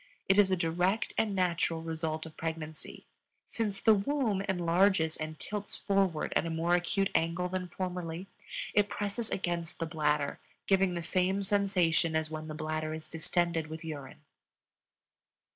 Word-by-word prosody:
It 195 +1 +5
is 200 -2 +6
a 190 - +3
direct 175 +5 +1
and 210 -3 +1
natural 170 -3 +1
result 160 -1 -3
of 160 - -10
pregnancy. 160 -2 -5 0.4
Since 210 -4 -2
the 220 - +6
womb 215 -1 +1
enlarges 175 -2 +3
and 155 0 -5
tilts 205 +4 -4
forward 195 -5 +1
at - - +4
a 165 - -3
more 165 +2 +1
acute 180 +2 +2
angle 170 +2 +1
than 185 0 -2
formerly, 180 -1 -4 0.5
it 205 -1 +4
presses 205 +2 -2
against 170 -3 -2
the 165 - -1
bladder, 150 -3 0 0.3
giving 190 -2 +3
the 170 - -3
same 185 +3 +1
sensation 180 -5 +2
as 160 0 0
when 155 0 -5
the 155 - -5
bladder 155 0 -2
is 155 -1 -7
distended 165 0 0
with 160 +2 -7
urine. 150 -2 -7
175 Hz, 155 wpm, -31 LUFS, 160-195 Hz, 0.5 s, is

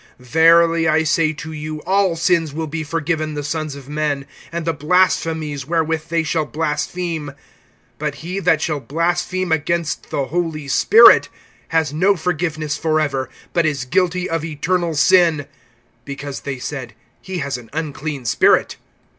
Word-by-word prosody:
(28)Verily 165 +5 +4
I 160 +1 +3
say 155 0 +2
to 160 +1 -8
you, 155 0 -5
all 195 -2 +2
sins 165 -3 +1
will 160 0 -2
be 155 +1 -4
forgiven 155 0 -2
the 145 - -3
sons 155 -1 -3
of 140 -2 -11
men, 145 -2 -2 0.3
and 170 -1 -4
the 165 - 0
blasphemies 155 -3 0
wherewith 160 -1 0
they 165 0 +1
shall 160 0 0
blaspheme. 155 0 -3 0.7
(29)But 150 -1 -2
he 180 +6 -5
that 160 -5 +2
shall 155 -3 -1
blaspheme 175 +6 -1
against 160 +1 -1
the 140 - -1
Holy 160 -1 -3
Spirit 430 - +6 0.4
has 160 -3 0
no 190 +6 +3
forgiveness 160 -3 -2
forever, 155 -4 0 0.2
but 170 -2 +2
is 140 -5 -2
guilty 180 +6 0
of 165 -1 -2
eternal 165 +2 -1
sin; 165 -2 +4 0.6
(30)because 140 0 -6
they 140 -2 -4
said: 125 -3 -6 0.3
He 190 -1 -5
has 140 -5 -3
an 115 -2 -15
unclean 150 -3 -4
spirit. - - +3
155 Hz, 150 wpm, -19 LUFS, 145-170 Hz, 0.7 s, Spirit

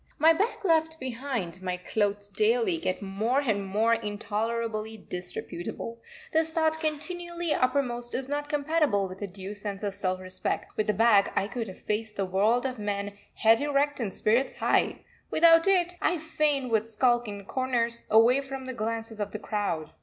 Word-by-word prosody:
My 320 +2 +6
bag 410 +4 -1
left 320 -2 +2
behind, 235 -8 -4
my 180 -1 -2
clothes 205 +2 -1
daily 430 - +2
get 185 - -2
more 215 +7 0
and 215 -7 0
more 215 +4 +2
intolerably 220 +1 -2
disreputable, 180 +4 -6 0.3
this 320 0 +3
thought 320 -1 +1
continually 345 +2 -2
uppermost 250 -2 0
is 260 0 -2
not 290 +1 -3
compatible 295 -9 +1
with 185 +2 -10
a 205 - -2
due 195 +1 -7
sense 205 -1 -5
of 200 -1 -1
self 185 -2 -2
respect. 185 0 -4
With 215 - 0
the 210 - +3
bag 210 -2 +5
I 195 - +1
could 230 0 -4
have 190 - -10
faced 215 0 -2
the 195 - -1
world 210 +7 +2
of 255 -3 -3
men 205 -1 -3 0.2
head 225 +2 +4
erect 290 0 +1
and 220 -5 -2
spirits 235 +8 +1
high; - - +1 0.2
without 330 +2 +6
it, 360 -2 +3
I 355 - +2
fain 300 -4 0
would 220 -1 +1
skulk 240 +1 +2
in 200 -1 -6
corners, 235 -1 -1
away 235 +5 +5
from 270 -1 -7
the 260 - -4
glances 225 -1 -3
of 205 - -2
the - - -2
crowd. 200 -8 -2
230 Hz, 175 wpm, -28 LUFS, 205-290 Hz, 0.3 s, My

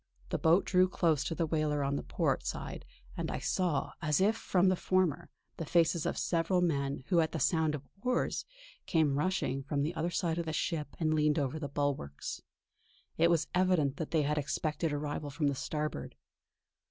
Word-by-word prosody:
The - - -1
boat 165 +4 +4
drew 185 0 +4
close 160 -5 +2
to 165 - -2
the 165 - +1
whaler 150 -2 0
on 140 +1 0
the - - -1
port 70 - 0
side, - - -5 0.3
and - - -3
I - - -2
saw, 175 -7 0
as 150 -3 +2
if 210 +4 +3
from 190 -4 +2
the 185 - +3
former, 185 -4 0 0.3
the - - -3
faces 170 -1 +2
of - - -2
several 170 +2 +1
men 140 -6 0
who 175 -3 +4
at 160 -1 +1
the - - -2
sound 155 +2 +2
of 140 -1 -9
oars 250 +2 0 0.4
came 155 -5 +2
rushing 180 -6 0
from 140 +1 -1
the 160 +4 -1
other 170 0 -1
side 170 -2 -1
of 170 - -3
the 160 - -2
ship 155 -2 -2
and 155 -2 +2
leaned 150 0 +2
over 145 +1 -1
the 145 -2 -4
bulwarks. 140 - -3 0.8
It 170 +1 +5
was 170 -2 +3
evident 180 -7 +2
that 160 - -3
they 160 -2 +2
had 150 +1 +1
expected 155 +2 -1
arrival 145 0 -3
from 145 +1 0
the - - 0
starboard. 150 +3 -4
155 Hz, 195 wpm, -32 LUFS, 145-170 Hz, 0.8 s, It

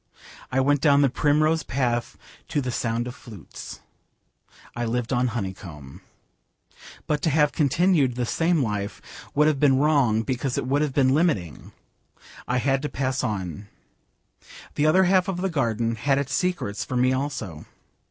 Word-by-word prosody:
I 130 - +1
went 140 +1 +2
down 145 -2 +5
the 135 - +2
primrose 155 +3 +2
path 120 -3 -2 0.3
to - - -1
the 130 -2 -2
sound 115 0 -1
of 125 - -6
flutes. 105 -9 -11 0.9
I 120 - -2
lived 120 +2 -2
on 125 +1 +2
honeycomb. 95 - -6 1.0
But 150 -1 -1
to 160 - +1
have 150 0 +3
continued 150 -3 +2
the 125 0 -1
same 165 +3 +1
life 105 -3 -3 0.4
would 150 +1 +4
have 150 -3 +2
been 135 -2 +4
wrong 135 -7 +2
because 130 +1 -2
it - - -1
would 140 +3 +1
have 150 -3 -1
been 130 -2 +4
limiting. 110 - -1 0.8
I 125 - 0
had 135 +1 +1
to 150 - -3
pass 130 -1 -2
on. 95 -2 -4 1.1
The 150 - +1
other 185 +5 +5
half 185 +1 +3
of 190 -2 -2
the 190 +1 -2
garden 115 -5 0
had 135 +4 +1
its 140 -1 -2
secrets 155 - -1
for 125 - -4
me 130 +1 +3
also. 130 - -4
130 Hz, 160 wpm, -24 LUFS, 115-150 Hz, 1.1 s, down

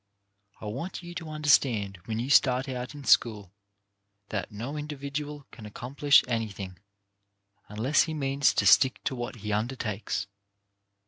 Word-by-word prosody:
I - - -9
want 140 - -5
you 175 0 -8
to 170 -3 -6
understand 125 -10 +2
when 110 -1 -3
you 125 +4 -2
start 130 0 +4
out 125 +1 -5
in 145 - -9
school, 105 -8 +2 0.8
that 100 -4 -4
no 120 +8 -5
individual 145 0 -5
can 110 -4 -10
accomplish 140 +6 +3
anything 100 -6 -4 0.9
unless 115 +8 +2
he 160 -2 -4
means 140 -1 +1
to - - +2
stick 130 -1 +5
to - - -1
what 120 -1 -5
he 105 - -1
undertakes. 105 -3 -2
130 Hz, 140 wpm, -28 LUFS, 105-145 Hz, 0.9 s, stick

